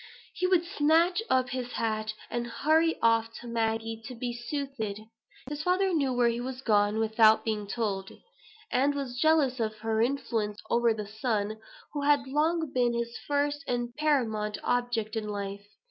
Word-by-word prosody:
He 365 Hz, -, 0 dB
would 360 Hz, -2 st, +3 dB
snatch 335 Hz, +5 st, +3 dB
up 255 Hz, -1 st, +2 dB
his 250 Hz, -1 st, -4 dB
hat, 215 Hz, -1 st, -1 dB, 0.2 s
and 240 Hz, 0 st, -2 dB
hurry 315 Hz, +7 st, +2 dB
off 230 Hz, 0 st, +3 dB
to 240 Hz, -, -9 dB
Maggie 225 Hz, -1 st, -1 dB
to 250 Hz, -, -7 dB
be 240 Hz, 0 st, -3 dB
soothed. 240 Hz, -4 st, -4 dB, 0.5 s
His 295 Hz, +1 st, -4 dB
father 370 Hz, +3 st, +2 dB
knew 280 Hz, -5 st, +1 dB
where 245 Hz, -1 st, +3 dB
he 235 Hz, +1 st, -2 dB
was 260 Hz, +1 st, -5 dB
gone 205 Hz, -2 st, +3 dB
without 220 Hz, 0 st, +4 dB
being 210 Hz, -2 st, -2 dB
told; 200 Hz, -3 st, -2 dB, 0.6 s
and 280 Hz, +3 st, +2 dB
was 255 Hz, -3 st, -4 dB
jealous 300 Hz, -5 st, +3 dB
of 220 Hz, -1 st, -1 dB
her 220 Hz, 0 st, 0 dB
influence 225 Hz, -5 st, -1 dB
over 235 Hz, 0 st, +4 dB
the 215 Hz, -1 st, -3 dB
son 215 Hz, 0 st, -2 dB, 0.3 s
who 290 Hz, -, -2 dB
had 285 Hz, -1 st, +3 dB
long 310 Hz, +3 st, 0 dB
been 245 Hz, -2 st, +2 dB
his 235 Hz, 0 st, -3 dB
first 290 Hz, 0 st, 0 dB
and 240 Hz, -1 st, -2 dB
paramount 225 Hz, -9 st, 0 dB
object 240 Hz, -3 st, 0 dB
in 215 Hz, -1 st, -3 dB
life. 200 Hz, 0 st, -5 dB
240 Hz, 165 wpm, -29 LUFS, 220-285 Hz, 0.6 s, without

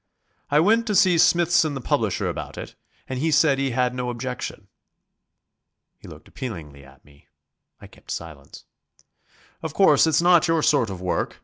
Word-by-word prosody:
"I 145 Hz, -, +3 dB
went 225 Hz, +7 st, +2 dB
to 210 Hz, -, -1 dB
see 185 Hz, -4 st, +4 dB
Smithson 170 Hz, -3 st, +3 dB
the -, -, -4 dB
publisher 120 Hz, -, -1 dB
about -, -, -6 dB
it, -, -, -8 dB, 0.3 s
and 130 Hz, -1 st, -5 dB
he 160 Hz, +4 st, 0 dB
said 145 Hz, -2 st, +3 dB
he 135 Hz, 0 st, 0 dB
had 125 Hz, 0 st, -1 dB
no 125 Hz, -1 st, -4 dB
objection...." 125 Hz, -4 st, -6 dB, 1.3 s
He -, -, -14 dB
looked -, -, -13 dB
appealingly 75 Hz, -, -8 dB
at 70 Hz, 0 st, -20 dB
me. 70 Hz, -1 st, -23 dB, 0.5 s
I -, -, -13 dB
kept -, -, -19 dB
silence. 75 Hz, -4 st, -9 dB, 1.0 s
"Of 160 Hz, -2 st, -6 dB
course, 165 Hz, -6 st, +4 dB
it's 160 Hz, -1 st, +2 dB
not 175 Hz, -1 st, +4 dB
your 165 Hz, -2 st, +1 dB
sort 135 Hz, -7 st, +2 dB
of 95 Hz, -2 st, -7 dB
work. 90 Hz, -, -3 dB
135 Hz, 170 wpm, -23 LUFS, 105-165 Hz, 1.3 s, see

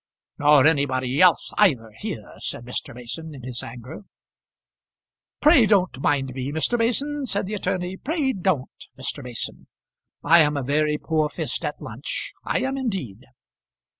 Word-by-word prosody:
"Nor 145 Hz, -1 st, +6 dB
anybody 135 Hz, -3 st, +2 dB
else 180 Hz, -2 st, +4 dB
either, 130 Hz, -, +3 dB
here," -, -, -6 dB
said 120 Hz, -, -5 dB
Mr. 125 Hz, -1 st, -4 dB
Mason 150 Hz, +6 st, -7 dB
in 130 Hz, -, -11 dB
his 125 Hz, -1 st, -3 dB
anger. 120 Hz, -, -9 dB, 1.4 s
"Pray 290 Hz, -7 st, +6 dB
don't 185 Hz, -9 st, +2 dB
mind 135 Hz, -3 st, +1 dB
me, 130 Hz, +1 st, -4 dB
Mr. 160 Hz, +10 st, +1 dB
Mason," 270 Hz, +5 st, 0 dB
said 200 Hz, -2 st, -1 dB
the 205 Hz, -, -5 dB
attorney, 185 Hz, -2 st, -2 dB
"pray 285 Hz, -, -1 dB
don't, 180 Hz, -9 st, -2 dB
Mr. 130 Hz, +2 st, -3 dB
Mason. 125 Hz, -3 st, -5 dB, 0.6 s
I 170 Hz, -, +7 dB
am 150 Hz, -1 st, +2 dB
a 140 Hz, -, -2 dB
very 150 Hz, +3 st, +1 dB
poor 155 Hz, -1 st, 0 dB
fist -, -, -3 dB
at -, -, -3 dB
lunch; -, -, -5 dB
I -, -, 0 dB
am 270 Hz, +1 st, -1 dB
indeed." 155 Hz, -, -4 dB
150 Hz, 150 wpm, -24 LUFS, 130-200 Hz, 1.4 s, I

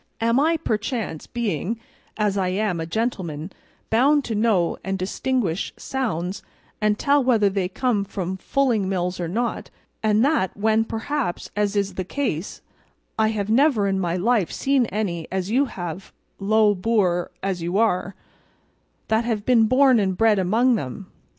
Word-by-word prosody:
Am 230 Hz, +3 st, +2 dB
I, 325 Hz, +3 st, +3 dB
perchance, 220 Hz, -, -3 dB
being, 220 Hz, -2 st, -2 dB, 0.4 s
as 210 Hz, -2 st, +1 dB
I 190 Hz, -2 st, 0 dB
am, 185 Hz, -1 st, -1 dB
a 160 Hz, -, -4 dB
gentleman, 180 Hz, -6 st, -3 dB, 0.4 s
bound 280 Hz, +6 st, +4 dB
to 225 Hz, -, -3 dB
know 210 Hz, -5 st, +1 dB
and 195 Hz, 0 st, -2 dB
distinguish 195 Hz, -1 st, -1 dB
sounds 195 Hz, -9 st, -3 dB, 0.4 s
and 210 Hz, 0 st, +2 dB
tell 285 Hz, +3 st, +3 dB
whether 220 Hz, -6 st, +3 dB
they 190 Hz, -2 st, -1 dB
come 220 Hz, 0 st, 0 dB
from 190 Hz, -2 st, -4 dB
fulling 230 Hz, -4 st, 0 dB
mills 180 Hz, -1 st, -2 dB
or 175 Hz, -, -2 dB
not; 230 Hz, +7 st, -2 dB, 0.3 s
and 215 Hz, +2 st, +3 dB
that, 280 Hz, -, +1 dB
when 220 Hz, +2 st, +2 dB
perhaps, 230 Hz, -2 st, -3 dB
as 205 Hz, 0 st, 0 dB
is 200 Hz, -1 st, 0 dB
the 185 Hz, -, -3 dB
case, 190 Hz, -, -3 dB, 0.6 s
I 220 Hz, -, +4 dB
have 215 Hz, -1 st, -2 dB
never 245 Hz, -4 st, +3 dB
in 195 Hz, -1 st, 0 dB
my 175 Hz, -2 st, -1 dB
life 205 Hz, 0 st, +1 dB
seen 270 Hz, -3 st, +1 dB
any 180 Hz, -7 st, -3 dB
as 190 Hz, +1 st, -2 dB
you 270 Hz, +4 st, +3 dB
have, 175 Hz, -, -7 dB, 0.3 s
low 210 Hz, +1 st, +3 dB
boor 185 Hz, -3 st, +1 dB
as 190 Hz, -3 st, -2 dB
you 175 Hz, +3 st, -1 dB
are, 195 Hz, -3 st, +1 dB, 0.9 s
that 220 Hz, +1 st, +2 dB
have 220 Hz, -3 st, -2 dB
been 230 Hz, -3 st, +4 dB
born 255 Hz, 0 st, +5 dB
and 190 Hz, -3 st, 0 dB
bred 220 Hz, -3 st, +4 dB
among 225 Hz, +7 st, +3 dB
them? 180 Hz, +4 st, -7 dB
210 Hz, 160 wpm, -23 LUFS, 185-235 Hz, 0.9 s, born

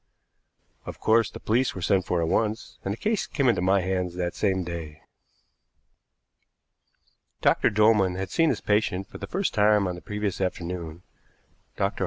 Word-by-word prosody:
Of -, -, -7 dB
course, 110 Hz, -1 st, +3 dB
the -, -, -10 dB
police 120 Hz, +3 st, +1 dB
were 95 Hz, -, -6 dB
sent 95 Hz, -1 st, +2 dB
for 85 Hz, -2 st, +1 dB
at -, -, 0 dB
once, 110 Hz, +5 st, -1 dB
and 95 Hz, -, -2 dB
the 105 Hz, -, -3 dB
case 215 Hz, -, -1 dB
came 140 Hz, -3 st, 0 dB
into 115 Hz, -, +3 dB
my 95 Hz, +1 st, +3 dB
hands 90 Hz, -1 st, -2 dB
that 90 Hz, -1 st, -2 dB
same 95 Hz, -2 st, 0 dB
day. 80 Hz, -3 st, -7 dB, 2.4 s
Dr. -, -, +3 dB
Dolman 105 Hz, -3 st, +3 dB
had 95 Hz, 0 st, -4 dB
seen 165 Hz, -1 st, +3 dB
his -, -, -1 dB
patient 105 Hz, -3 st, 0 dB
for -, -, -11 dB
the -, -, -6 dB
first 195 Hz, +1 st, -1 dB
time 105 Hz, -2 st, +3 dB
on 90 Hz, -, -2 dB
the 90 Hz, -, -9 dB
previous 105 Hz, -2 st, -3 dB
afternoon. 85 Hz, -2 st, -4 dB, 0.7 s
Dr. -, -, -1 dB
95 Hz, 170 wpm, -26 LUFS, 90-110 Hz, 2.4 s, course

